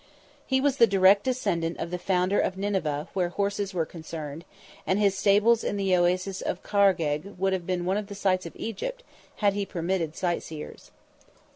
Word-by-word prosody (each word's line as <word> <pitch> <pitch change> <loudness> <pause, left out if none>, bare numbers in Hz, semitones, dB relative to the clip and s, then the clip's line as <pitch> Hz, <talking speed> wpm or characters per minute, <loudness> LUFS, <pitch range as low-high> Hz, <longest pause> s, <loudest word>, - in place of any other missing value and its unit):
He 265 -1 +2
was 280 0 +1
the 230 - +7
direct 195 0 +5
descendant 190 -10 -1
of 170 - -4
the 180 - -3
founder 185 +2 +1
of 185 - 0
Nineveh 185 -7 -2
where 180 -2 0
horses 200 +1 -2
were 170 -4 -1
concerned, 160 -1 -8 0.4
and 190 - +2
his 200 -2 +3
stables 210 +4 +4
in 205 - -2
the 195 -2 +2
Oasis 180 +2 +1
of 180 - -3
Khargegh 190 -3 +1
would 190 +1 +1
have 180 -2 -3
been 180 -1 -1
one 190 +2 +1
of 210 -1 -4
the 200 - -8
sights 185 -3 0
of - - -12
Egypt, - - -5 0.3
had 205 -2 +2
he 205 0 -1
permitted 170 -3 -2
sightseers. 170 -3 -4
190 Hz, 180 wpm, -27 LUFS, 175-200 Hz, 0.4 s, the